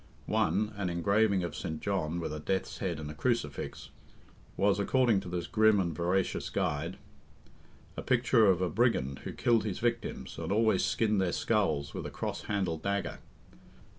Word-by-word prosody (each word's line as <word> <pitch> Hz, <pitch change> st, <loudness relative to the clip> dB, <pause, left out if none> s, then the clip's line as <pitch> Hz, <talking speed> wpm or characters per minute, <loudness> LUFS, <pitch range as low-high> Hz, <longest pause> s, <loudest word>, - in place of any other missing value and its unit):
One 105 Hz, +6 st, +1 dB
(an 95 Hz, -3 st, -1 dB
engraving 100 Hz, +3 st, +2 dB
of 85 Hz, -, -4 dB
St. 80 Hz, -1 st, -4 dB
John, 85 Hz, -4 st, -1 dB
with 80 Hz, -, -3 dB
a 75 Hz, -, -4 dB
death's 95 Hz, +5 st, -2 dB
head 85 Hz, -5 st, -2 dB
and 75 Hz, -1 st, -6 dB
a -, -, -7 dB
crucifix) 75 Hz, -, -2 dB, 0.7 s
was, 100 Hz, +1 st, +3 dB
according 120 Hz, 0 st, +3 dB
to 90 Hz, -, -8 dB
this 90 Hz, -1 st, -3 dB
grim 110 Hz, -1 st, +4 dB
and 85 Hz, -3 st, 0 dB
veracious 90 Hz, +3 st, 0 dB
guide, 80 Hz, +5 st, -2 dB, 1.0 s
a -, -, -4 dB
picture 120 Hz, -3 st, +3 dB
of 95 Hz, -1 st, +3 dB
a 90 Hz, -, +1 dB
brigand 70 Hz, -, +1 dB
who -, -, -3 dB
killed 115 Hz, -3 st, +2 dB
his 100 Hz, -3 st, -3 dB
victims, 120 Hz, 0 st, -2 dB
and 85 Hz, +2 st, -3 dB
always 110 Hz, -2 st, +3 dB
skinned 105 Hz, -3 st, +1 dB
their 90 Hz, -2 st, +1 dB
skulls 70 Hz, -3 st, 0 dB
with -, -, -4 dB
a -, -, -5 dB
cross -, -, -4 dB
handled 95 Hz, -6 st, -1 dB
dagger. 100 Hz, +1 st, -2 dB
95 Hz, 170 wpm, -30 LUFS, 85-110 Hz, 1.0 s, grim